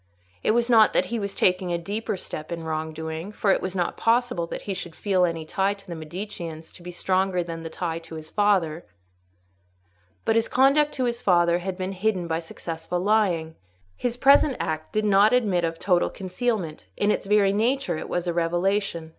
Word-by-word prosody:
It -, -, 0 dB
was 235 Hz, 0 st, +2 dB
not 225 Hz, -3 st, +6 dB
that 185 Hz, -, +3 dB
he 235 Hz, -, 0 dB
was 200 Hz, -1 st, -4 dB
taking 185 Hz, -1 st, +2 dB
a 170 Hz, -, +1 dB
deeper 200 Hz, +4 st, -3 dB
step 155 Hz, -3 st, -7 dB
in 170 Hz, -1 st, -4 dB
wrong 160 Hz, 0 st, -3 dB
doing, 160 Hz, +4 st, -5 dB
for 210 Hz, -1 st, +1 dB
it -, -, +2 dB
was 185 Hz, 0 st, -4 dB
not 175 Hz, -2 st, -1 dB
possible 230 Hz, -7 st, +1 dB
that -, -, -6 dB
he 200 Hz, -, -3 dB
should 175 Hz, -3 st, -7 dB
feel 190 Hz, -3 st, +2 dB
any 165 Hz, -2 st, -3 dB
tie 195 Hz, +5 st, 0 dB
to 200 Hz, -1 st, -17 dB
the 175 Hz, -, -5 dB
Mediceans 165 Hz, -1 st, -7 dB
to -, -, -14 dB
be 175 Hz, -, -8 dB
stronger 185 Hz, 0 st, 0 dB
than 165 Hz, -1 st, -6 dB
the 165 Hz, -, -6 dB
tie 165 Hz, 0 st, -3 dB
to 165 Hz, -1 st, -11 dB
his 155 Hz, 0 st, -9 dB
father; 185 Hz, -6 st, +1 dB, 1.4 s
but 225 Hz, -, +2 dB
his 230 Hz, 0 st, +2 dB
conduct 280 Hz, +3 st, +4 dB
to 260 Hz, -, -2 dB
his 240 Hz, 0 st, -2 dB
father 175 Hz, -4 st, +3 dB
had 185 Hz, +1 st, -4 dB
been 185 Hz, 0 st, -3 dB
hidden 190 Hz, -2 st, -1 dB
by 160 Hz, 0 st, -1 dB
successful 165 Hz, +1 st, -5 dB
lying: 180 Hz, -5 st, +1 dB, 0.4 s
his 240 Hz, -1 st, -2 dB
present 275 Hz, +1 st, +5 dB
act 155 Hz, 0 st, -3 dB
did 215 Hz, 0 st, 0 dB
not 205 Hz, +2 st, +5 dB
admit 205 Hz, -8 st, +2 dB
of 165 Hz, 0 st, -1 dB
total 180 Hz, -1 st, +2 dB
concealment—in 200 Hz, -1 st, -2 dB
its -, -, -2 dB
very 200 Hz, -1 st, +4 dB
nature 250 Hz, +5 st, +1 dB
it -, -, -7 dB
was 175 Hz, 0 st, -1 dB
a 175 Hz, -, -1 dB
revelation. 175 Hz, 0 st, 0 dB
185 Hz, 200 wpm, -25 LUFS, 165-210 Hz, 1.4 s, not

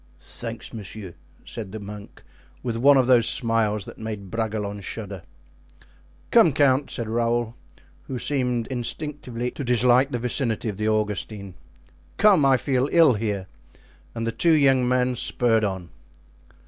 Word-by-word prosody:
"Thanks, -, -, -7 dB
monsieur," 100 Hz, -3 st, -8 dB, 0.3 s
said 105 Hz, -5 st, -7 dB
the 110 Hz, -, -6 dB
monk, 100 Hz, 0 st, -10 dB, 0.4 s
with 120 Hz, -2 st, -2 dB
one 140 Hz, +4 st, +5 dB
of 130 Hz, -, +4 dB
those 120 Hz, -3 st, +4 dB
smiles 110 Hz, -4 st, 0 dB
that -, -, -11 dB
made 105 Hz, -4 st, -6 dB
Bragelonne 105 Hz, -3 st, -3 dB
shudder. 100 Hz, -2 st, -7 dB, 1.1 s
"Come, 220 Hz, -, +6 dB
count," 140 Hz, 0 st, +3 dB
said 115 Hz, -3 st, -3 dB
Raoul, 115 Hz, 0 st, 0 dB, 0.5 s
who 130 Hz, -, -4 dB
seemed 125 Hz, -3 st, 0 dB
instinctively 125 Hz, -1 st, -4 dB
to 140 Hz, -, -6 dB
dislike 125 Hz, +2 st, +3 dB
the 125 Hz, -, -2 dB
vicinity 120 Hz, -2 st, -1 dB
of 100 Hz, -, -6 dB
the 110 Hz, +1 st, 0 dB
Augustine; 105 Hz, -2 st, -2 dB, 0.6 s
"come, 200 Hz, -7 st, +5 dB
I 135 Hz, -1 st, +5 dB
feel 130 Hz, +1 st, 0 dB
ill 165 Hz, -6 st, +6 dB
here," 105 Hz, -3 st, -2 dB, 0.7 s
and 115 Hz, -1 st, -3 dB
the 115 Hz, -, -1 dB
two 165 Hz, +7 st, +3 dB
young 135 Hz, -4 st, +3 dB
men 125 Hz, 0 st, +1 dB
spurred 115 Hz, -1 st, +1 dB
on. 95 Hz, -4 st, -3 dB
115 Hz, 145 wpm, -24 LUFS, 105-130 Hz, 1.1 s, Come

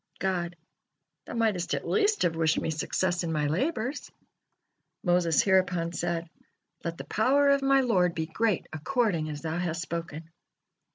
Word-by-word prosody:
God: 180 Hz, -2 st, -1 dB, 0.7 s
"Thou -, -, -7 dB
mightest 215 Hz, -6 st, +1 dB
at -, -, -5 dB
least 425 Hz, 0 st, +2 dB
have 165 Hz, -2 st, +1 dB
wished 160 Hz, -1 st, +2 dB
Me 160 Hz, -, -2 dB
success 175 Hz, +3 st, -1 dB
in 165 Hz, -, -2 dB
My 150 Hz, -2 st, 0 dB
labors." 245 Hz, -, -2 dB, 0.9 s
Moses 175 Hz, -4 st, +3 dB
hereupon 180 Hz, -3 st, +2 dB
said: 170 Hz, 0 st, -2 dB, 0.6 s
"Let 170 Hz, 0 st, -4 dB
the -, -, -6 dB
power 275 Hz, +6 st, +3 dB
of 280 Hz, 0 st, +4 dB
my 275 Hz, 0 st, +4 dB
Lord 185 Hz, -8 st, +2 dB
be 160 Hz, -1 st, -1 dB
great 210 Hz, +4 st, 0 dB
according 170 Hz, -, 0 dB
as 150 Hz, 0 st, -6 dB
Thou 160 Hz, +1 st, -2 dB
hast 170 Hz, -1 st, -2 dB
spoken." 165 Hz, -2 st, -6 dB
175 Hz, 155 wpm, -28 LUFS, 165-220 Hz, 0.9 s, of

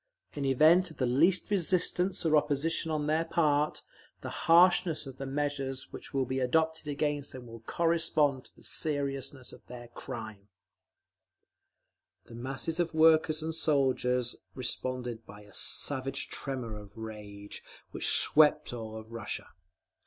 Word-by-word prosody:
In 140 Hz, -, -3 dB
event 160 Hz, +7 st, +5 dB
of 160 Hz, -, -14 dB
the 130 Hz, -, +1 dB
least 165 Hz, +12 st, +2 dB
resistance 185 Hz, 0 st, +1 dB
or 155 Hz, -1 st, +4 dB
opposition 150 Hz, +2 st, +1 dB
on 155 Hz, -2 st, -1 dB
their 155 Hz, +2 st, +1 dB
part, 150 Hz, -3 st, +1 dB, 0.4 s
the -, -, -6 dB
harshness 170 Hz, -2 st, +4 dB
of 135 Hz, -1 st, -10 dB
the 135 Hz, -, -4 dB
measures 140 Hz, -1 st, -3 dB
which -, -, -7 dB
will 135 Hz, -1 st, 0 dB
be 130 Hz, +2 st, -2 dB
adopted 160 Hz, +5 st, +1 dB
against 145 Hz, -1 st, -2 dB
them 130 Hz, -1 st, -9 dB
will 115 Hz, -1 st, -10 dB
correspond 155 Hz, -1 st, +1 dB
to -, -, -15 dB
the -, -, -20 dB
seriousness 140 Hz, -3 st, -3 dB
of -, -, -14 dB
their 120 Hz, -1 st, -10 dB
crime…. 110 Hz, -5 st, -8 dB, 1.8 s
The -, -, -14 dB
masses 135 Hz, +7 st, -4 dB
of 170 Hz, -1 st, -1 dB
workers 160 Hz, -1 st, +4 dB
and 160 Hz, 0 st, -3 dB
soldiers 130 Hz, -5 st, +1 dB, 0.2 s
responded 125 Hz, -2 st, -3 dB
by 105 Hz, +1 st, -12 dB
a 105 Hz, -, -18 dB
savage 135 Hz, -1 st, 0 dB
tremor 125 Hz, -5 st, -4 dB
of 105 Hz, +1 st, -14 dB
rage, 105 Hz, -2 st, -8 dB, 0.3 s
which -, -, -1 dB
swept 150 Hz, -2 st, +4 dB
all 110 Hz, -2 st, -6 dB
Russia. 115 Hz, +1 st, -6 dB
140 Hz, 140 wpm, -30 LUFS, 125-160 Hz, 1.8 s, event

